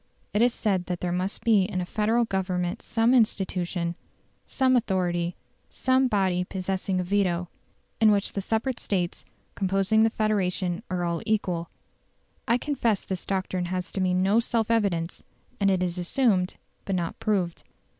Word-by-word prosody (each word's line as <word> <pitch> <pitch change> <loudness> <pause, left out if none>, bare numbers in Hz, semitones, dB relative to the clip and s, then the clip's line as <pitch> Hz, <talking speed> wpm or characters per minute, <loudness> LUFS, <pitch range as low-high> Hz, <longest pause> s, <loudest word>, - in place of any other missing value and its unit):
It 210 - +2
is 245 +1 +5
said 195 -6 -1
that 180 -1 -2
there 180 - -2
must 185 +3 -2
be 220 -4 +5
in 185 -1 -1
a 180 - -2
Federal 220 +5 +1
Government 185 -3 -2
some 230 +2 +2
institution, 185 -7 +1 0.5
some 260 -1 +2
authority, 180 -6 0 0.3
some 260 0 +2
body 190 -5 +1
possessing 190 0 -2
a - - 0
veto 180 -2 0 0.5
in 220 0 +6
which 200 -1 +1
the 200 - -2
separate 225 +5 -1
States 180 -4 -2 0.3
composing 195 +2 +2
the 225 - +5
Confederation 190 -5 0
are 180 -2 -1
all 170 -1 -1
equal. 180 -6 0 0.8
I 235 - +4
confess 240 -6 0
this 190 -2 -5
doctrine 185 -2 -1
has 180 0 -3
to 195 - -2
me 180 -1 +2
no 195 +4 +3
self 230 -1 0
evidence, 185 -7 0 0.4
and 200 -1 +3
it 185 -1 +2
is 180 0 -2
assumed, 185 -1 +1 0.3
but 195 - -2
not 170 -2 -3
proved. 185 -5 -1
190 Hz, 160 wpm, -26 LUFS, 180-220 Hz, 0.8 s, in